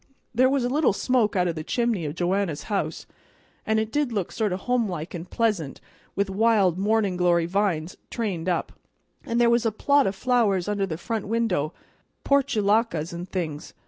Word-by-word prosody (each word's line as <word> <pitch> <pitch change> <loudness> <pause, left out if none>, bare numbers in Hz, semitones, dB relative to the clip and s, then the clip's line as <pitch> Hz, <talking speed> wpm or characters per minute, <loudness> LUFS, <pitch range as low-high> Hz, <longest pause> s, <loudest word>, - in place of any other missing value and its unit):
There 255 +2 +4
was 270 -2 +1
a - - +1
little 280 -2 +2
smoke 235 -1 +1
out 180 -1 +2
o' - - +1
the 155 -1 -6
chimney 230 -5 0
o' - - -3
Joanna's 175 -2 -1
house, 195 - -2 0.6
and 220 0 +2
it 220 0 -2
did 290 -2 0
look 200 -6 -2
sort 215 -3 -1
of 185 +1 -3
homelike 200 -10 -1
and 175 0 -7
pleasant 205 -12 -1 0.4
with 200 0 +1
wild 195 -3 +2
mornin' 205 -2 +1
glory 175 -1 +3
vines 180 -3 -1
trained 185 -7 -2
up; 175 - -1 0.6
an' 230 - -1
there 240 0 +5
was 235 0 +3
a 225 - +1
plot 280 +5 +3
o' - - +1
flowers 205 -3 +1
under 205 -1 0
the 160 -3 -4
front 215 +4 -3
window, 205 -9 0 0.5
portulacas 220 - +1
and 175 +2 -6
things. 160 -5 -4
200 Hz, 180 wpm, -25 LUFS, 175-230 Hz, 0.6 s, there